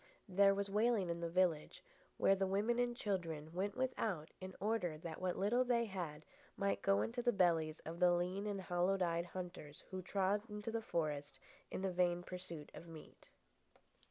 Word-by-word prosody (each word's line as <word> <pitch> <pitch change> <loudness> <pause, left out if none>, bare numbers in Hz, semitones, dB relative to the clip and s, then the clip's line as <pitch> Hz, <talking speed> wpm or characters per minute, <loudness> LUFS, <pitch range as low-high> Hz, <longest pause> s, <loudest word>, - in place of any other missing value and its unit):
There 195 +1 +5
was 200 0 -1
wailing 210 -2 +2
in 170 0 -4
the 170 - -1
village, 170 -3 +1 0.3
where 195 - +5
the 195 0 +1
women 210 +5 +1
and 240 -1 +1
children 165 -7 -2
went 195 +5 -2
without 220 -11 -1
in 185 0 -7
order 200 -6 0
that 160 +1 -7
what 185 -1 0
little 225 +6 +3
they 240 -2 +2
had 170 -7 -5 0.3
might 200 0 0
go 195 0 +3
into 245 +2 -2
the 240 0 +3
bellies 165 -6 +2
of 165 +2 -7
the 180 -1 +6
lean 180 +4 0
and 200 -2 -2
hollow 180 +2 +1
eyed 170 -1 +1
hunters 175 -5 -7
who 185 0 -3
trod 195 +2 +1
the 210 +2 -3
forest 150 -7 -2 0.3
in 190 - -4
the 190 - +1
vain 175 0 +2
pursuit 175 -5 -7
of 170 - -10
meat. 160 -2 -12
185 Hz, 180 wpm, -38 LUFS, 170-205 Hz, 0.3 s, the